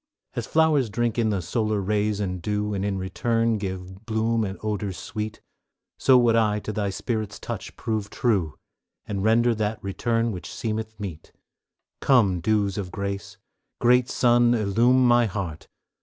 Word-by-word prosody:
As 120 -3 -3
flowers 155 -6 +3
drink 120 +2 -1
in 110 -2 +2
the 100 -4 -1
solar 110 +4 0
rays 105 +1 0
and 95 -3 -3
dew, 105 +2 -1
And 95 -1 -2
in 100 -1 -1
return 115 +4 0
give 95 +1 -6
bloom 110 0 +1
and 95 -1 -4
odors 105 -3 -2
sweet, 110 0 -5 0.6
So 130 -1 +6
would 120 -2 +4
I 105 -2 +3
to 110 - -5
Thy 105 -1 -1
Spirit's 105 +1 -3
touch - - -6
prove 110 -3 -2
true, 100 - 0 0.5
And 100 -2 -3
render 115 +2 +4
that 110 0 -1
return 115 +4 0
which 90 -5 -7
seemeth 110 -1 -4
meet; 90 -6 -7 0.7
Come, 105 -10 +3
dews 100 +1 +1
of 95 -3 -4
grace! 100 -1 -5 0.4
Great 125 0 +4
Sun, 120 -1 +4
illume 120 +4 +3
my 120 -1 +5
heart! 90 -6 -5
105 Hz, 155 wpm, -25 LUFS, 100-115 Hz, 0.7 s, So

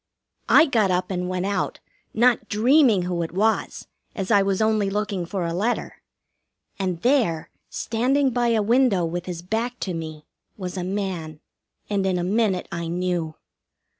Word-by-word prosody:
I - - +7
got 225 - +2
up 180 +1 0
and 180 -1 -2
went 185 0 -2
out, 200 -2 -2 0.3
not 235 -1 +2
dreaming 230 - +4
who 175 -1 -2
it 165 - -3
was, 215 +4 0 0.3
as 195 0 -3
I 205 -2 +6
was 195 -1 0
only 215 -2 +2
looking 200 -3 -2
for 185 -1 -2
a 165 - -2
letter; 215 +8 -2 0.8
and 185 -3 -1
there, 235 - +1 0.2
standing 260 +4 +1
by 245 -1 +1
a 225 -2 +2
window 230 -5 +3
with 175 +2 -4
his 175 -2 -5
back 230 +6 -2
to 185 - -2
me, 155 -2 -6 0.3
was 185 -2 -5
a 180 - -3
man, 180 -5 -4 0.5
and 200 -2 0
in 185 -1 +1
a 175 - -1
minute 195 0 0
I 170 -1 -4
knew. 175 -2 -2
195 Hz, 165 wpm, -23 LUFS, 180-220 Hz, 0.8 s, I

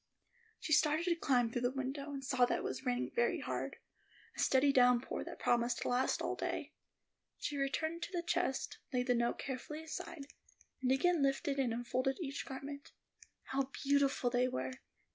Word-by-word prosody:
She 310 - -1
started 305 +2 +4
to 345 -2 +3
climb 250 -8 +2
through 240 - -1
the 245 - +2
window, 275 +2 -4
and 275 -1 -5
saw 255 -2 +4
that - - 0
it - - -5
was 260 - -4
raining 250 0 0
very 480 - +2
hard; - - -3 0.6
a - - -11
steady 275 +1 +4
downpour 250 -1 +4
that - - -8
promised 240 0 +1
to - - -1
last 250 +1 +1
all - - 0
day. - - -3 0.6
She 295 - -3
returned 315 +4 -1
to 365 - -4
the 350 -2 -2
chest, 345 -6 -1
laid 250 -1 +1
the 250 - +3
note 235 0 +1
carefully 280 +4 -5
aside, 320 -1 -6 0.6
and 255 0 +2
again 335 +5 +3
lifted 275 0 +1
out 270 - +3
and 235 - 0
unfolded 255 +3 0
each 285 -5 -4
garment. 280 +1 -7 0.6
How 270 0 0
beautiful 280 -3 +3
they 250 0 +3
were! 130 - -2
270 Hz, 180 wpm, -35 LUFS, 250-295 Hz, 0.6 s, started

